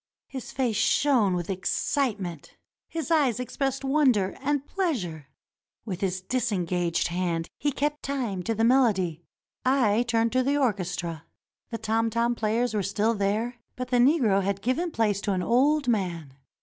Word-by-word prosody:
His 260 -3 -8
face 250 -5 0
shone 240 -10 +3
with 175 -1 -3
excitement; 195 - -2 0.3
his 330 0 -4
eyes 275 -8 +3
expressed 270 +2 -2
wonder 265 -9 +2
and 285 0 0
pleasure. 200 - -2 0.6
With 190 -5 -5
his 185 -1 -1
disengaged 180 -7 -1
hand 170 -2 -1
he 290 - +1
kept 295 +2 -2
time 245 -9 -2
to 225 - 0
the 225 - 0
melody. 210 - +3 0.4
I 245 -5 +3
turned 230 0 +2
to 255 +2 +2
the 280 +3 +1
orchestra. 180 - -2 0.4
The 230 - -3
tom 225 +1 0
tom 235 +2 +1
players 230 +1 0
were 210 - +1
still 205 +4 +1
there, 215 +4 -1 0.2
but 255 0 -5
the 250 - +2
Negro 240 -6 +4
had 195 0 -2
given 310 +9 0
place 210 -8 0
to 205 - 0
an 180 -1 -1
old 275 +6 +2
man. 175 - -1
225 Hz, 155 wpm, -26 LUFS, 190-260 Hz, 0.6 s, Negro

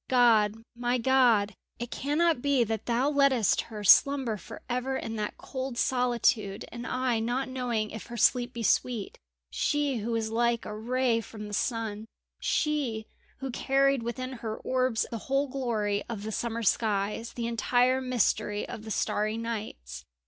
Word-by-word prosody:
"God! 225 -5 +4 0.2
my 245 +1 0
God! 235 -5 +3 0.2
it 240 0 -6
cannot 300 0 +1
be 280 -3 +3
that 225 -1 -3
Thou 245 +3 +2
lettest 275 -7 +3
her 210 -2 -6
slumber 265 +2 +5
for 195 - -10
ever 250 +2 -1
in 225 0 -5
that 210 -1 -3
cold 260 -2 -5
solitude 235 -5 +1
and 240 +1 -6
I 250 -2 0
not 245 +4 -1
knowing 245 -4 -2
if 220 - -8
her 235 - -7
sleep 245 +2 +3
be 235 -2 -5
sweet. 225 +1 0 0.3
She 290 -3 0
who 220 +1 -4
was 220 -1 -1
like 235 0 +1
a 210 - -5
ray 240 +1 +1
from 210 -1 -9
the 205 - -8
sun 220 -1 -2 0.3
she 275 -8 0 0.4
who 270 -1 -3
carried 275 +1 +2
within 255 +3 -4
her 220 -1 -3
orbs 255 -3 0
the 230 - -3
whole 275 +5 0
glory 225 -6 -1
of 215 -4 -5
the 220 - -4
summer 230 +1 -2
skies, 210 +1 0
the 235 - -3
entire 245 +2 +2
mystery 220 -4 0
of 215 - -8
the - - -7
starry 215 +1 0
nights. 215 - -5
235 Hz, 165 wpm, -28 LUFS, 220-255 Hz, 0.4 s, slumber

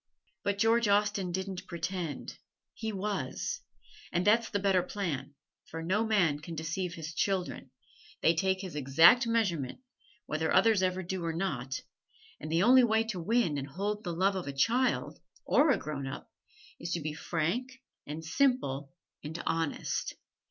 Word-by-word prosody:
But 200 0 0
George 225 +2 +3
Austen 205 -2 +2
didn't 190 +1 -4
pretend 170 -3 -4 0.3
he 220 0 -4
was. 210 - -3 0.5
And 175 +1 0
that's 220 +2 +4
the 205 - 0
better 195 -2 +3
plan, 175 -7 -4 0.3
for 165 0 -5
no 190 +6 +1
man 180 -9 +3
can 165 +2 -7
deceive 170 +3 -3
his 165 0 -6
children 190 +2 -1 0.5
they 165 - +6
take 190 +2 +1
his 185 -5 -7
exact 165 - +6
measurement, 180 - 0 0.5
whether 155 +1 -1
others 205 +1 +5
ever 185 0 0
do 185 0 -4
or 165 -1 -1
not 140 -7 -2 0.6
and 155 +1 -6
the 165 +3 +3
only 255 +3 +7
way 220 -1 +3
to 190 -6 -3
win 200 -6 +1
and 135 - -5
hold 205 +8 -3
the 175 - -3
love 190 +4 +2
of 185 -5 -4
a 140 - -3
child 245 - +1 0.3
(or 300 +2 +4
a 260 - +4
grown 140 -4 -5
up) 135 - -7 0.5
is 170 - -3
to 170 - 0
be 155 -1 -3
frank 195 +12 -2 0.3
and 155 +2 -6
simple 160 - +1 0.3
and 155 +2 -5
honest. 165 -2 -1
185 Hz, 160 wpm, -31 LUFS, 160-210 Hz, 0.6 s, only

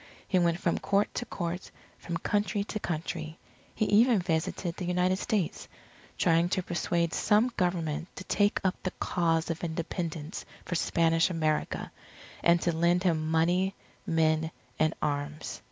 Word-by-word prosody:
He 185 - +3
went 170 -1 +2
from 170 - 0
Court 200 +1 +1
to 245 - -3
Court, 175 -2 -4 0.3
from 170 -1 -3
Country 205 +2 0
to 215 +1 -4
Country 160 -2 -4 0.4
he 215 - +1
even 230 +3 +5
visited 170 0 -1
the 180 - -4
United 180 +1 +2
States 195 -4 -1 0.5
trying 170 0 +3
to 185 0 0
persuade 170 -1 0
some 225 +4 +3
Government 175 -4 -1
to - - -7
take 205 +2 +2
up 190 -1 0
the 185 - -1
cause 165 -1 +1
of 165 - -5
Independence 165 -1 -3 0.2
for - - -4
Spanish 165 0 +2
America, 155 -3 -1 0.5
and 170 0 +5
to 175 - +2
lend 170 +2 +3
him 160 -4 +1
money, 175 +4 +2 0.3
men, 160 -1 +2 0.3
and 155 0 +2
arms. 145 0 -3
170 Hz, 150 wpm, -29 LUFS, 165-185 Hz, 0.5 s, even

